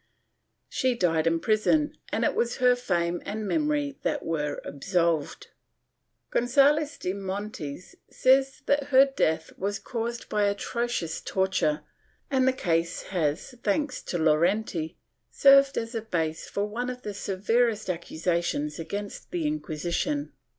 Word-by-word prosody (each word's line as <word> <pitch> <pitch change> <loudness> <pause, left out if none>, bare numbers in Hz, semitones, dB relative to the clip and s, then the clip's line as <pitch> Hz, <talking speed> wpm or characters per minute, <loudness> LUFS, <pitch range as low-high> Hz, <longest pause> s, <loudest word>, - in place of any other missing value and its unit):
She 255 -1 0
died 165 -6 +2
in 165 0 +2
prison 225 - +2 0.2
and - - 0
it - - +2
was 235 0 0
her 250 0 +5
fame 175 -8 -1
and 215 0 -4
memory 295 0 0
that - - -1
were 150 -3 -2
absolved. 165 +1 -1 0.8
Gonzalez 285 +4 +3
de 180 - -2
Montes 190 -5 -5 0.2
says 265 +1 +3
that 285 0 +2
her 270 -1 +6
death 160 -12 0
was 200 +2 -1
caused 235 -1 -4
by 210 -1 +1
atrocious 200 -3 -2
torture 185 -5 0 0.5
and 260 -1 +3
the - - +6
case 170 -9 -1
has, 165 - -1
thanks 290 +9 0
to 175 - -2
Llorente, 165 +1 +1 0.3
served 275 0 +6
as 230 +1 -3
a 225 - -2
base 165 -7 -2
for 200 - -1
one 240 +4 -3
of 250 0 -7
the 210 - -4
severest 215 +3 0
accusations 170 -3 -1
against 200 +5 -6
the 345 -3 -2
Inquisition. 290 - -2
205 Hz, 135 wpm, -27 LUFS, 170-255 Hz, 0.8 s, her